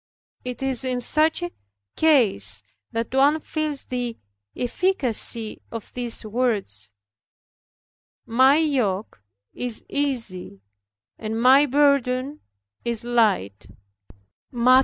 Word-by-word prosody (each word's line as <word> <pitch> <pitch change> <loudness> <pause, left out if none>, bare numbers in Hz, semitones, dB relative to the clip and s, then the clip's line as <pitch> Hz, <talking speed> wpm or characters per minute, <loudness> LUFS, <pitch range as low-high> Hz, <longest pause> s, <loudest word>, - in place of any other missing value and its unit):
It 250 +1 -5
is 265 -3 0
in 255 -1 -1
such 310 - +2
a 175 - -3 0.4
case 195 - +2 0.3
that 230 +2 -3
one 285 +4 +4
feels 305 -2 -3
the 245 -2 -4 0.4
efficacy 245 - +1
of 230 -2 -8
these 240 -2 -1
words, 210 - -2 1.4
"My 260 +5 +5
yoke 230 - -1 0.3
is 245 -3 -3
easy, 230 - -2 0.6
and 220 +1 -3
my 265 +4 +6
burden 280 0 +2 0.4
is 235 -2 -2
light" 210 - +1 0.8
(Matt. 250 +1 +5
245 Hz, 95 wpm, -23 LUFS, 220-275 Hz, 1.4 s, my